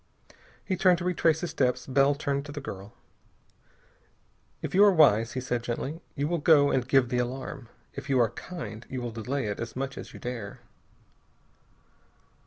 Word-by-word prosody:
He 190 - 0
turned 185 -1 +4
to 175 - -5
retrace 165 -3 +2
his 175 - -3
steps. 125 -2 0
Bell 135 +1 +3
turned 140 -1 -2
to - - -7
the 145 - -5
girl. 100 -6 -8 1.7
"If - - -4
you 195 +3 +6
are 205 - +7
wise," 120 - +4
he 130 - -2
said 125 -2 -2
gently, 130 +7 -4
"you 145 -1 -1
will 170 +1 0
go 145 -2 +5
and 125 -2 0
give 130 -2 +3
the 125 - 0
alarm. 130 0 -4 0.2
If 140 - -8
you 135 -2 +3
are 115 -3 +3
kind, 120 - -7
you 130 - -4
will 120 -1 -4
delay 120 +4 -3
it 105 -1 -3
as 115 -1 -5
much 135 +1 -4
as - - -9
you - - -11
dare." 120 -5 -6
135 Hz, 185 wpm, -28 LUFS, 120-150 Hz, 1.7 s, are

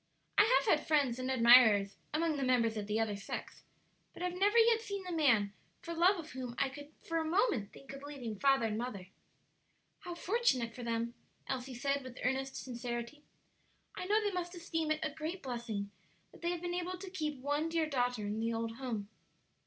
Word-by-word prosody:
I 420 - +7
have - - +4
had - - -13
friends 280 -6 +2
and 255 0 -2
admirers 230 -5 +6 0.2
among 320 0 +1
the 275 - -1
members 240 -3 +2
of 210 -2 -4
the 215 +1 0
other 220 -2 0
sex, 200 - -6 0.5
but - - -7
have 360 -1 -1
never 405 +5 +3
yet 455 0 +6
seen 400 -3 -5
the 365 - -6
man 245 -11 +3 0.3
for 335 - -6
love 355 +4 +4
of 320 -2 -7
whom 250 -2 -6
I 275 - +2
could 290 +2 -10
for 330 0 -1
a - - 0
moment 315 - +1
think 275 0 -11
of 275 - -8
leaving 260 -8 -6
father 270 -4 +4
and 215 0 -1
mother." 205 -7 -5 0.9
"How 350 - -7
fortunate 340 - +1
for 250 - -8
them!" 230 0 -2 0.3
Elsie 260 -1 -4
said, 275 +3 0
with 255 -1 -9
earnest 265 +1 -1
sincerity. 240 +3 -5 0.7
"I - - -5
know 420 +3 +3
they 415 -2 0
must 360 -1 -3
esteem 325 -2 -2
it 310 0 0
a 305 - -2
great 320 +5 -5
blessing 235 -6 -4 0.4
that - - -16
they 340 - 0
have 350 -1 -2
been 350 0 -2
able 360 +1 -2
to 375 0 -8
keep 305 -5 -2
one 290 +4 0
dear 325 -1 +1
daughter 245 -6 0
in 210 +2 -2
the 230 +1 0
old 225 0 -3
home." 235 -6 -3
270 Hz, 205 wpm, -34 LUFS, 235-335 Hz, 0.9 s, I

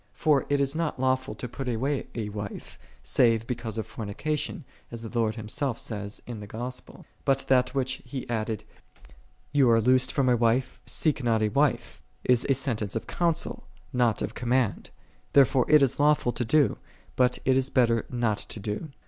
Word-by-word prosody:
For 150 -3 +2
it 145 0 +2
is 140 +1 +1
not 165 -4 -2
lawful 130 0 0
to 125 - -5
put 135 +2 -6
away 130 +4 -1
a 110 -3 -3
wife, 105 -1 -7 0.2
save 115 -2 +3
because 115 -2 -4
of 110 - -2
fornication,6 145 +9 -4 0.3
as 115 -1 -7
the 115 +1 -8
Lord 110 -1 +1
Himself 115 +3 -2
saith 105 -2 -5
in 120 -3 -6
the 105 - -8
Gospel. 125 +4 -7 0.2
But 135 -1 +1
that, 125 0 +3
which 130 -1 -1
he 130 0 -6
added, 110 -2 -2 0.5
" - - -28
Thou 140 -4 +5
art 115 -1 +4
loosed 130 +2 +3
from 135 -2 +1
a 125 - +5
wife, 120 +2 +1
seek 150 -4 0
not 115 -2 +2
a 105 - +2
wife," 140 +3 0 0.2
is 125 -1 +2
a 135 - +4
sentence 115 -6 -2
of 115 - -2
counsel, 170 -2 -1 0.3
not 120 -3 +2
of - - -4
command; 120 -5 0 0.4
there 140 -1 +8
fore 130 -1 0
it 150 -2 +7
is 135 - +1
lawful 145 -4 +3
to 120 - -2
do, 145 +4 +3 0.4
but 125 -1 +3
it 130 - +4
is 135 0 +1
better 115 -4 +2
not 115 -4 0
to - - -7
do. 105 +10 -4
125 Hz, 190 wpm, -27 LUFS, 115-135 Hz, 0.5 s, there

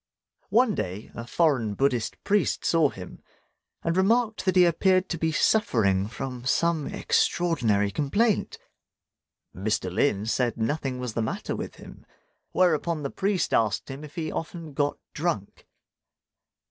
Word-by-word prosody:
One 225 +2 +4
day 95 - -4
a 115 0 -7
foreign 130 -10 +1
Buddhist 130 -3 0
priest 205 -2 +1
saw 165 -4 +4
him, 90 -6 -10 0.6
and 165 0 0
remarked 220 +4 +2
that 185 - +2
he 180 -1 +7
appeared 185 +2 +3
to 170 - -2
be 160 0 +1
suffering 110 - +2
from 125 +1 -6
some 160 +3 +1
extraordinary 115 -13 +1
complaint. 195 - 0 1.0
Mr. 95 -2 -1
Lin 105 -1 +1
said 120 +1 0
nothing 130 +3 -1
was 125 -3 -4
the 115 - -1
matter 110 - -3
with - - -6
him; - - -13 0.5
whereupon 170 -3 +1
the 140 - -3
priest 195 -1 0
asked 110 +4 +1
him 135 +3 -8
if 150 +1 -11
he 160 -3 -3
often 165 -2 -6
got 145 +1 0 0.2
drunk. 150 - -3
145 Hz, 140 wpm, -26 LUFS, 115-175 Hz, 1.0 s, he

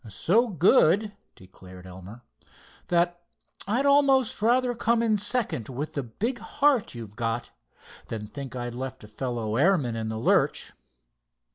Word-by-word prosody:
"So 205 - +2
good," 200 - +3 0.2
declared 90 0 -14
Elmer; 95 +6 -11 0.7
"that 175 0 +1 0.5
I'd 245 +7 0
almost 275 -5 +3
rather 245 +2 +2
come 235 0 +1
in 220 -2 +2
second 205 - 0
with 140 +4 -5
the 140 - -2
big 220 - -4
heart 280 - +1
you've 110 -3 -9
got, 115 -1 -3 0.6
than 110 -2 -5
think 135 +3 -8
I'd 120 -1 -4
left 130 0 -6
a - - -11
fellow 115 -1 -3
airman 145 -7 +2
in 110 -1 -3
the 110 - -4
lurch." 110 - +1
145 Hz, 140 wpm, -26 LUFS, -, 0.7 s, good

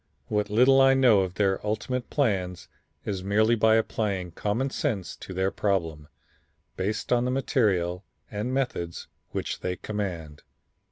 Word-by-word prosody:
What 105 -1 0
little 130 +5 +5
I 135 0 +6
know 125 -6 +5
of 95 -1 -1
their 95 -2 +1
ultimate 110 +4 -2
plans 90 - -1 0.4
is 95 -2 -3
merely 110 +4 +3
by 110 -1 +4
applying 100 -5 -1
common 115 +10 -1
sense 110 - -2
to - - -9
their 95 +1 0
problem, 80 -7 -1 0.7
based 105 +6 -1
on 120 0 +3
the 125 - 0
material 100 -9 +1 0.3
and 105 +4 -3
methods 120 -11 -2 0.2
which - - -4
they 90 0 -2
command. 90 -8 -5
105 Hz, 145 wpm, -26 LUFS, 95-120 Hz, 0.7 s, I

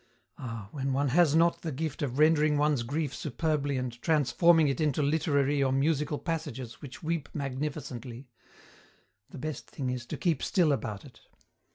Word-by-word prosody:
Ah, 115 -5 -6
when 135 -2 -2
one 140 +1 +1
has 160 +1 +4
not 170 +1 +3
the 160 - -3
gift 155 +1 -4
of 135 -3 -2
rendering 155 -1 +4
one's 145 -3 +2
grief 140 +3 -2
superbly 145 +1 -1
and 125 -2 -4
transforming 160 +2 +4
it 140 +3 -1
into 150 -1 +1
literary 145 -1 +2
or 135 -1 +2
musical 145 +2 +1
passages 135 -8 -5
which 140 0 -10
weep 160 -2 -2
magnificently, 135 -3 -5 1.0
the - - -10
best 155 +1 -5
thing 130 -3 -3
is 125 -1 -5
to - - -4
keep 165 -7 0
still 175 -6 +2
about 110 -6 -3
it. 125 -5 -15
145 Hz, 165 wpm, -29 LUFS, 130-155 Hz, 1.0 s, has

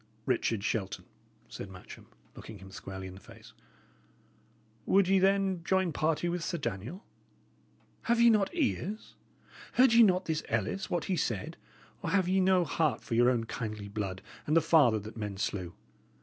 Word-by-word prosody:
"Richard 115 -4 0
Shelton," 100 -3 -2 0.4
said 100 - -8
Matcham, 90 -1 -12 0.3
looking 110 - -10
him 95 0 -13
squarely 95 0 -7
in 95 - -8
the 95 - -12
face, - - -15 1.3
"would 195 -1 +4
ye, 195 0 +4
then, 195 -2 +2
join 190 -2 +1
party 155 +3 0
with 175 0 -2
Sir 170 - -2
Daniel? 120 - -5 1.0
Have 235 0 +2
ye 235 0 +7
not 205 -3 +2
ears? 225 - -2 0.6
Heard 255 -2 +5
ye 235 - +7
not 185 -4 +4
this 160 -2 -1
Ellis, 115 - -1
what 175 - -1
he 190 - 0
said? 115 - -2 0.5
or - - -3
have 190 -2 +2
ye 190 +1 +2
no 185 -1 +4
heart 155 -3 0
for 120 - -5
your 120 +2 +5
own 120 -3 +1
kindly 110 -3 -5
blood 100 -2 -4 0.2
and 155 +2 +3
the - - +8
father 155 -8 +4
that 110 +2 -8
men 105 -3 -4
slew? 90 -3 -3
155 Hz, 170 wpm, -30 LUFS, -, 1.3 s, the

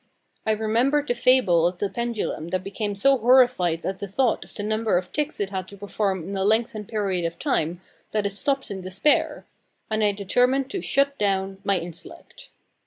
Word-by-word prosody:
I 220 - +4
remembered 240 +7 +1
the - - +3
fable 235 -9 +4
of 175 0 -4
the 205 - -1
pendulum 235 -7 -3
that 185 +1 -2
became 205 +1 -3
so 275 +8 +4
horrified 240 -9 +3
at 190 0 -3
the 200 - -5
thought 235 +5 +1
of - - -17
the 205 - -4
number 215 -1 +1
of 180 0 -4
ticks 300 +1 -2
it 200 -1 -2
had 190 -2 -4
to 200 - -10
perform 195 -3 -2
in 200 - -4
a 190 - 0
lengthened 215 0 +1
period 195 -5 -1
of 165 0 -3
time, 175 - -1 0.3
that 210 -1 -1
it 200 - 0
stopped 270 +5 -1
in 190 -1 -5
despair; 185 +11 +1 0.5
and 215 0 +1
I 205 - +4
determined 250 +7 +1
to 385 - -3
"shut 280 0 +1
down" 195 -1 0
my 200 -1 +2
intellect. 170 -1 -10
205 Hz, 195 wpm, -24 LUFS, 190-245 Hz, 0.5 s, I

